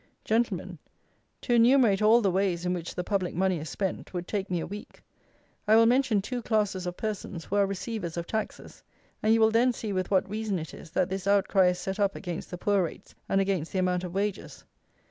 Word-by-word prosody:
Gentlemen, 195 -6 -1 0.6
to 245 - -1
enumerate 235 -4 +5
all 220 +3 +6
the 195 -3 +2
ways, 180 -2 0
in 180 - +1
which 175 -2 -5
the 180 - -2
public 185 -3 -1
money 185 -1 +1
is 155 0 -6
spent, 190 -1 -4
would 175 0 -4
take 200 -2 -3
me 180 -2 0
a - - -3
week. 205 +3 -10 0.6
I 215 - +6
will 230 0 +7
mention 240 -4 +3
two 245 +3 -4
classes 205 -5 0
of 175 - -5
persons 205 -5 -4
who 200 - -3
are 200 -1 +4
receivers 195 -3 -4
of 170 - -3
taxes: 220 +2 -5 0.4
and 215 - +2
you 225 - +5
will 220 0 +5
then 240 +3 +3
see 215 -3 -4
with 185 -1 -1
what 190 -2 +2
reason 210 -1 -2
it 160 -1 -6
is, 170 - -11
that 180 +3 0
this 190 0 -4
outcry 200 -1 +4
is 180 0 +1
set 190 +3 -4
up 200 -1 +1
against 175 -4 -6
the 180 - -6
poor 200 +2 +2
rates 165 - -7 0.2
and 195 - +2
against 190 -5 -1
the - - -1
amount 180 -1 +1
of 180 - -5
wages. 200 0 -3
195 Hz, 220 wpm, -28 LUFS, 180-215 Hz, 0.6 s, will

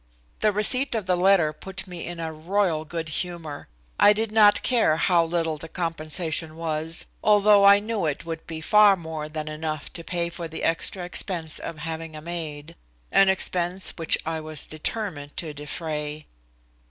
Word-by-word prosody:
The 215 - +3
receipt 240 +6 +3
of 215 -4 -2
the 185 -1 +2
letter 180 -4 +3
put 190 +5 -7
me 175 -3 -6
in 175 -1 -6
a 160 -1 -4
royal 165 0 0
good 160 +1 -5
humor. 160 -2 -5 0.3
I 205 - +7
did 220 +1 -1
not 210 -2 +5
care 230 -11 +3
how 170 0 +3
little 165 -2 -1
the 165 - -8
compensation 160 -1 -2
was, 160 0 -2 0.2
although 205 -1 +5
I 200 0 +9
knew 210 -4 -2
it 150 +2 -3
would 165 -1 -6
be 160 -1 -6
far 210 +3 +6
more 160 -3 -6
than 155 0 -5
enough 155 -1 -5
to 170 - -7
pay 170 0 -1
the 165 -1 -6
extra 170 +2 0
expense 170 -3 -2
of 165 - -6
having 160 0 -6
a 155 - -8
maid, 165 -2 -6 0.4
an 195 -1 +5
expense 185 -1 +1
which 165 -2 +1
I 160 0 -2
was 155 -2 -3
determined 155 -3 -4
to 160 -3 -4
defray. 150 0 -5
165 Hz, 170 wpm, -25 LUFS, 155-190 Hz, 0.4 s, I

